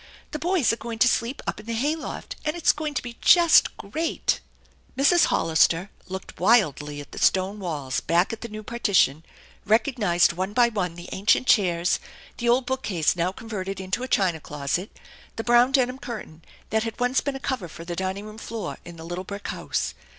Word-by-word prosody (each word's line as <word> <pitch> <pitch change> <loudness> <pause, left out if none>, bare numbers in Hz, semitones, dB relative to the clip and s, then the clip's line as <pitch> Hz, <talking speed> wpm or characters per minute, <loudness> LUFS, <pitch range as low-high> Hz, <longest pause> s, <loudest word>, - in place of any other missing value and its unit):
The 305 - -4
boys 345 -7 +2
are - - -3
going 235 -1 -6
to 250 - +5
sleep 240 +2 0
up - - -3
in 210 - -12
the 230 - -2
hay 290 +7 +1
loft, 320 - -7
and 305 +1 -1
it's 345 - +4
going 300 -1 -4
to - - -1
be 240 -1 -9
just 340 -2 +6
great 315 +12 -1 0.2
\ - - -32
' - - -33
J 275 - 0
Mrs. 345 +2 +6
Hollister 165 +3 +2 0.2
looked 190 0 -8
wildly 150 - +2
at 145 - -10
the - - -7
stone 190 +2 +2
walls, 150 -8 -3
back 175 +5 +1
at 225 - -7
the 235 - -6
new 215 0 -7
partition, 200 - +2 0.4
recognized 210 -7 +2
one 185 +4 -3
by 240 +1 +4
one 185 -7 -2
the 175 +1 -9
ancient 205 +6 +2
chairs, 180 -7 +3 0.4
the 240 -1 0
old 245 +2 +3
bookcase 215 - 0
now 175 +1 0
converted 195 -4 -5
into 190 +5 -2
a 255 - -3
china 185 -8 +1
closet, 150 +6 -3 0.5
the 225 - -4
brown 240 +2 +5
denim 260 -1 +1
curtain 205 - -8 0.3
that 220 +1 +2
had 225 +1 -5
once 250 +1 +2
been 280 -1 -3
a - - -5
cover 260 -9 -3
for 165 +1 -10
the 175 0 -4
dining 190 +3 -3
room 215 +1 -10
floor 225 -1 -5
in 175 - -10
the 160 - -10
little 175 +2 -5
brick 200 +2 -7
house. - - -2
210 Hz, 210 wpm, -25 LUFS, 175-245 Hz, 0.5 s, just